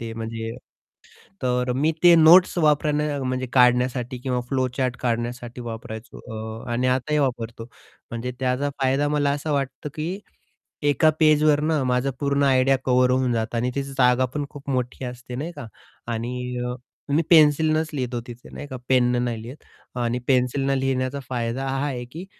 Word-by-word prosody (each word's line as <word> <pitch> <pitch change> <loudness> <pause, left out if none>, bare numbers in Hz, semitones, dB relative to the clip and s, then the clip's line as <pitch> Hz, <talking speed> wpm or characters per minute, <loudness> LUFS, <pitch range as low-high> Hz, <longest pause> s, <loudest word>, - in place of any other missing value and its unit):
ते, 115 -1 -5
म्हणजे 115 0 -5 0.9
तर 125 0 +1
मी 150 +5 +2
ते 175 -1 +9
नोट्स 170 +3 +7
वापरणं 150 -2 +1
म्हणजे 130 0 -2
काढण्यासाठी 125 0 +3
किंवा 125 -1 -1
फ्लोचार्ट 130 -1 -1
काढण्यासाठी 120 0 -3
वापरायचो. 115 0 -8
अ, 110 0 -7
आणि 125 +2 0
आताही 130 +4 +1
वापरतो. 115 -4 -2 0.5
म्हणजे 120 +2 -4
त्याचा 130 +2 0
फायदा 135 +2 +2
मला 145 -1 +1
असा 145 +2 -3
वाटतो, 140 +1 -3
की 170 +6 -3 0.7
एका 150 +3 +4
पेजवरनं 155 -1 +3
माझा 125 +2 +1
पूर्ण 140 0 +1
आयडिया 135 0 +4
कव्हर 125 0 +3
होऊन 130 -1 +1
जातं. 115 +1 -2
आणि 125 +2 0
तिची 140 - -1
जागा 125 -1 +3
पण 145 -1 -2
खूप 140 0 -10
मोठी 125 0 -2
असते 125 0 -7
नाही 155 +6 -4
का? 125 - -9 0.4
आणि 125 +2 -3 0.6
मी 165 - +4
पेन्सिलनेच 155 0 +4
लिहतो 125 -3 -2
तिथे 120 +1 -11
नाही 145 - -7
का, 130 -2 -6
पेन 125 -2 +4
नाही 115 -2 -3
लिहत. 130 +6 -10 0.4
आणि 120 +1 0
पेन्सिलने 135 +1 +1
लिहिण्याचा 130 +1 -1
फायदा 125 +2 -2
हा 135 +2 -1
आहे, 125 -3 -4
की 160 +9 -9
130 Hz, 155 wpm, -23 LUFS, 125-145 Hz, 0.9 s, ते